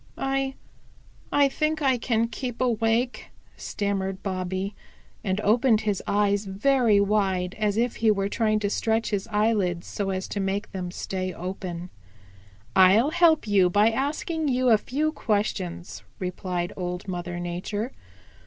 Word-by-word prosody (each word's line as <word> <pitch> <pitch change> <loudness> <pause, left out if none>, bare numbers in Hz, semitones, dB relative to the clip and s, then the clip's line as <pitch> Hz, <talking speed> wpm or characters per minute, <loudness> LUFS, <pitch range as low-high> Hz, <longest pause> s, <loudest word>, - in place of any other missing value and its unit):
"I 270 0 -1 0.8
I 285 -1 +5
think 305 +3 -1
I 260 -3 +3
can 230 -1 +1
keep 245 0 -5
awake," 235 0 0 0.3
stammered 195 -2 -3
Bobby 190 +1 -2 0.5
and 190 -1 0
opened 225 +1 +3
his 205 -3 -1
eyes 205 0 +2
very 215 +2 +3
wide 195 -3 +1
as 210 -1 +1
if 240 +1 0
he 225 - +3
were 200 -2 +2
trying 215 +1 +1
to 205 - 0
stretch 225 +1 0
his 200 -2 -1
eyelids 210 -5 +1
so 200 -2 -3
as 190 0 -2
to 205 - -3
make 195 +1 -2
them 180 -2 -4
stay 185 +1 -4
open. 180 -1 -6 0.8
"I'll 195 +9 +6
help 335 -4 +4
you 195 -3 +4
by 205 +5 +4
asking 300 +5 -1
you 255 -1 +2
a 220 - +7
few 300 +7 -1
questions," 205 - -2 0.2
replied 180 -1 -3
Old 180 +1 -4
Mother 175 -1 -4
Nature. 180 +7 -3
205 Hz, 145 wpm, -26 LUFS, 190-235 Hz, 0.8 s, a